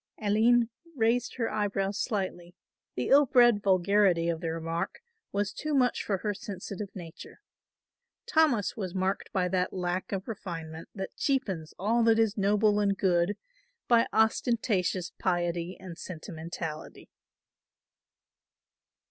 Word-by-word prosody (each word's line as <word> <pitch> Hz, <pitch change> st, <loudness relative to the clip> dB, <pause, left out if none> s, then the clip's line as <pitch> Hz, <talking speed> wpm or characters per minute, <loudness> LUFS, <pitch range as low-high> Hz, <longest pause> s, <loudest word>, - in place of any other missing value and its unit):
Aline 225 Hz, +3 st, +3 dB, 0.2 s
raised 235 Hz, 0 st, +1 dB
her 230 Hz, -3 st, -1 dB
eyebrows 200 Hz, -1 st, -1 dB
slightly, 185 Hz, -5 st, -3 dB, 0.4 s
the 125 Hz, -, -2 dB
ill 285 Hz, 0 st, +6 dB
bred 240 Hz, -4 st, +5 dB
vulgarity 190 Hz, -2 st, +3 dB
of 165 Hz, -1 st, -2 dB
the 165 Hz, -2 st, -2 dB
remark 165 Hz, -, -4 dB, 0.3 s
was 205 Hz, 0 st, -1 dB
too 305 Hz, -1 st, -2 dB
much 250 Hz, -2 st, +2 dB
for 195 Hz, -, 0 dB
her 210 Hz, +2 st, -2 dB
sensitive 200 Hz, 0 st, -6 dB
nature. 170 Hz, -4 st, -10 dB, 0.9 s
Thomas 310 Hz, -, +2 dB
was 190 Hz, -4 st, -5 dB
marked 190 Hz, +1 st, -1 dB
by 185 Hz, -2 st, +1 dB
that 185 Hz, 0 st, 0 dB
lack 180 Hz, 0 st, -2 dB
of 195 Hz, -1 st, -3 dB
refinement 165 Hz, -7 st, -6 dB
that 195 Hz, -1 st, -6 dB
cheapens 190 Hz, -, -1 dB
all 225 Hz, +5 st, +1 dB
that 225 Hz, -1 st, +5 dB
is 225 Hz, -2 st, +2 dB
noble 210 Hz, +1 st, +3 dB
and 200 Hz, -1 st, +1 dB
good 180 Hz, +1 st, +2 dB, 0.5 s
by 235 Hz, -1 st, +4 dB
ostentatious 220 Hz, -5 st, +1 dB
piety 175 Hz, -1 st, -1 dB
and 180 Hz, -3 st, -9 dB
sentimentality. 165 Hz, -2 st, -7 dB
195 Hz, 125 wpm, -29 LUFS, 175-220 Hz, 0.9 s, ill